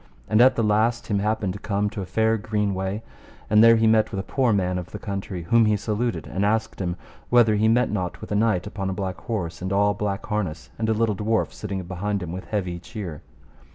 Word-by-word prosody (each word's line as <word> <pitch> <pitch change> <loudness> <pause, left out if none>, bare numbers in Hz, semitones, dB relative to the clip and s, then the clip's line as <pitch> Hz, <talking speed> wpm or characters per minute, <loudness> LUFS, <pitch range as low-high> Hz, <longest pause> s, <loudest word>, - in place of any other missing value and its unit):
And 110 +2 +4
at 130 +1 +6
the 115 - +1
last 110 +3 +2
him 100 -2 0
happened 105 -2 0
to 100 - -8
come 100 0 -1
to 110 -3 -5
a 95 - -6
fair 110 +4 +2
green 105 -1 -1
way, 95 +3 -3 0.5
and 105 +1 +7
there 115 0 +8
he 110 0 +2
met 110 -1 +4
with 100 - -4
a - - -2
poor 130 +2 +1
man 90 -3 +1
of 90 - -8
the - - -6
country, 95 -4 -5
whom 115 +5 +4
he 105 -1 +3
saluted 110 +3 -2
and 95 - -2
asked 110 0 0
him 90 -2 -1 0.3
whether 120 -3 +5
he 105 +1 +2
met 120 +1 +3
not 90 -4 -3
with - - -9
a - - +1
knight 105 -4 +2
upon 95 -2 -4
a - - -2
black 95 -1 -4
horse 95 -9 -4
and 95 +1 -3
all 100 +1 +3
black 100 -2 -3
harness, 90 - -3
a - - -3
little 110 0 +1
dwarf 110 +3 0
sitting 100 -3 -4
behind 95 +2 -3
him 85 - -5
with 90 +2 -6
heavy 90 -5 -3
cheer. 90 - -7
105 Hz, 235 wpm, -24 LUFS, 95-110 Hz, 0.5 s, there